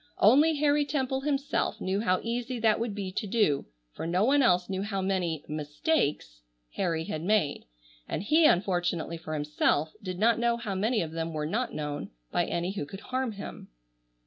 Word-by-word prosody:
Only 290 +10 +5
Harry 290 0 +3
Temple 265 -2 -1
himself 285 0 -1
knew 190 +2 -1
how 185 -4 +1
easy 245 +2 -2
that 220 -1 +3
would 230 -3 -2
be 195 -2 -4
to 210 +3 -3
do, 190 -10 +1 0.3
for - - -5
no 180 +4 +2
one 280 +3 +4
else 180 -7 +3
knew 190 -1 -2
how 200 -1 -2
many 180 -5 -1
"mistakes" 150 - -1
(?) - - -46
Harry 165 -3 0
had 155 -1 -4
made, 180 -5 +1 0.4
and - - -2
he, 310 +8 +5
unfortunately 175 - +1
for 155 -1 -5
himself, 150 +1 +1
did 185 -2 -5
not 230 +4 +3
know 235 0 +2
how 225 -4 -4
many 215 +2 +1
of 160 - -6
them 165 0 -3
were 155 -1 -2
not 225 +11 -2
known, 150 -1 -4 0.2
by - - +1
any 170 +2 -2
who 195 -7 -4
could 195 +6 -9
harm 255 -2 -2
him. 200 - -8
195 Hz, 190 wpm, -28 LUFS, 165-235 Hz, 0.4 s, Only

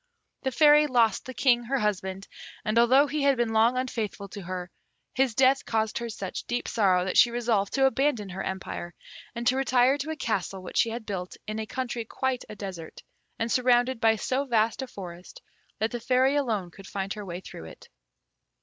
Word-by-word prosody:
The 265 - -1
Fairy 300 +3 +6
lost 235 -6 +2
the 260 - -7
King, 240 -1 +3
her 275 +3 0
husband, 195 -3 -2 0.4
and 215 +2 +2
although 260 +4 +6
he 300 +1 -2
had 280 -1 +3
been 235 -2 0
long 230 +3 +4
unfaithful 225 -6 -3
to 200 - -8
her, 180 0 -6 0.4
his 260 -3 +1
death 265 +2 +4
caused 220 0 -1
her 235 0 -4
such 195 -4 -6
deep 245 +1 -2
sorrow, 185 -5 +2
that 185 - +2
she 240 - +7
resolved 230 -4 0
to 270 -1 +3
abandon 265 -6 +1
her 185 +1 -5
empire, 190 -2 -5 0.4
and 235 0 -4
to 250 +2 +3
retire 260 +1 +3
to 290 +3 -4
a 315 - -2
castle 195 - -3
which - - -6
she 230 - +4
had 225 0 -6
built 185 -3 -5
in 215 +1 -4
a 220 - -4
country 245 -2 -3
quite 260 +3 -2
a 215 - -8
desert, 190 -5 -8 0.3
and 230 0 -2
surrounded 250 0 +3
by 225 -1 +4
so 260 +5 -1
vast 230 -1 +1
a 265 - -4
forest 180 - -10 0.4
that 220 +1 -1
the 240 - -3
Fairy 255 +3 +2
alone 220 -11 -1
could 195 +1 -13
find 195 0 -3
her 210 - -7
way 175 -2 -6
through 80 - -10
it. 80 - -13
230 Hz, 205 wpm, -27 LUFS, 195-260 Hz, 0.4 s, she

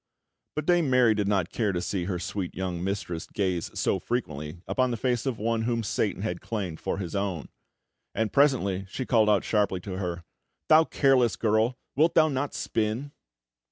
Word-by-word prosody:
But 150 - -2
Dame 175 -4 +3
Mary 125 -3 +5
did 105 -2 -1
not 95 -4 +1
care 110 -4 0
to 90 - -1
see 90 0 -2
her 90 -1 -2
sweet 90 +1 -4
young 90 -2 -3
mistress 95 -4 -3
gaze 95 -4 -1
so - - +1
frequently 80 - -4
upon 130 -1 +1
the 120 - -2
face 125 +2 0
of 125 -4 -1
one 115 +1 0
whom 115 0 0
Satan 105 -1 -1
had 90 -5 -3
claimed 95 -8 -4
for - - -2
his 95 -1 -5
own; 100 -5 -2 0.7
and 110 0 -1
presently 100 -10 +2
she 130 - -4
called 110 -4 +3
out 105 -2 +3
sharply 105 -4 +1
to 95 0 -6
her: 90 -2 -3 0.5
"Thou 160 +1 +7
careless 130 -7 +3
girl! 110 +3 +1 0.2
Wilt 160 +4 +3
thou 155 -1 +5
not 140 0 -2
spin?" 115 +6 -2
105 Hz, 185 wpm, -27 LUFS, 95-125 Hz, 0.7 s, Thou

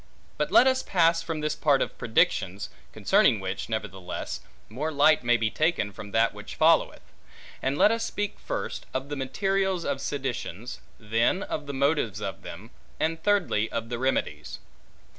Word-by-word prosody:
But - - -2
let 250 - +7
us 260 0 +3
pass 165 -2 +3
from 165 -2 -4
this 150 0 0
part 145 -3 +3
of - - -2
predictions 100 -4 +1 0.2
(concerning 110 - +3
which, 95 +2 -4
nevertheless, 95 -5 -4 0.3
more 145 +8 -3
light 150 -1 +4
may 120 0 +4
be 110 -1 0
taken 155 -10 +1
from 100 +1 -9
that 115 +3 +2
which - - -9
followeth); - - +3 0.6
and 135 +2 -1
let 210 - +6
us 230 0 0
speak 205 -1 -3
first, - - -4
of 130 +2 -2
the 145 - -3
materials 190 +7 0
of 140 -1 -2
seditions; 125 - -4 0.2
then 115 - +1
of 150 -2 -5
the - - -3
motives 135 -7 +1
of 100 -2 -5
them; 105 +8 -10 0.3
and 160 +1 0
thirdly 185 - +1
of 115 0 -3
the 120 -1 -3
remedies. 75 - -1
135 Hz, 165 wpm, -27 LUFS, 110-160 Hz, 0.6 s, let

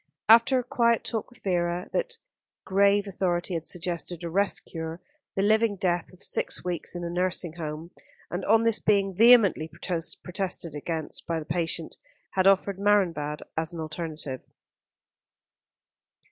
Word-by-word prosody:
After 230 +4 +7
a 250 - 0
quiet 235 -3 +2
talk 225 -2 -3
with 245 -1 -14
Vera, 175 -1 0
that - - -1 0.5
grave 200 +1 +3
authority 180 -1 -1
had 165 -2 -2
suggested 175 0 -3
a 170 - -4
rest 200 +3 +1
cure, 160 0 -6 0.4
the 195 - +1
living 220 0 +3
death 175 -3 -1
of 185 - -12
six - - -1
weeks 180 -1 -3
in 175 - -4
a - - -2
nursing 180 -2 -1
home; 160 0 -6 0.4
and 175 - -3
on 225 +2 +4
this 230 -2 +3
being 195 -2 +2
vehemently 215 -6 +6
protested 180 0 -3
against 160 +1 -4
by 165 - 0
the 155 - -5
patient, 165 -1 -3 0.3
had 190 0 +2
offered 195 0 +3
Marienbad 170 -8 +1
as 160 +1 0
an 170 - -6
alternative. 155 -4 -5
180 Hz, 145 wpm, -27 LUFS, 165-205 Hz, 0.5 s, After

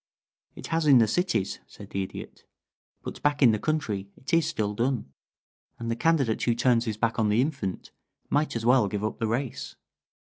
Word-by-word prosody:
"It - - -8
has 165 -1 +1
in 140 -3 +8
the 115 -2 +5
cities," 175 - 0
said - - -13
the 95 - -1
Idiot. 95 - -8 0.6
"But - - -7
back 145 -1 +2
in 120 - +7
the 110 - 0
country 110 -11 -2
it 130 - -8
is 165 -1 +4
still 105 -1 -1
done, 120 - -1 0.6
and 115 0 -4
the - - 0
candidate 135 -6 +1
who 120 - +2
turns 120 -1 +2
his 110 -3 -3
back 115 0 0
on 110 -1 +2
the 105 +2 +2
infant 130 - -2 0.4
might 150 -2 0
as 115 -1 -3
well 125 -3 +5
give 100 +1 -3
up 110 - -3
the 115 - 0
race. 120 +3 -3
115 Hz, 200 wpm, -27 LUFS, 110-140 Hz, 0.6 s, in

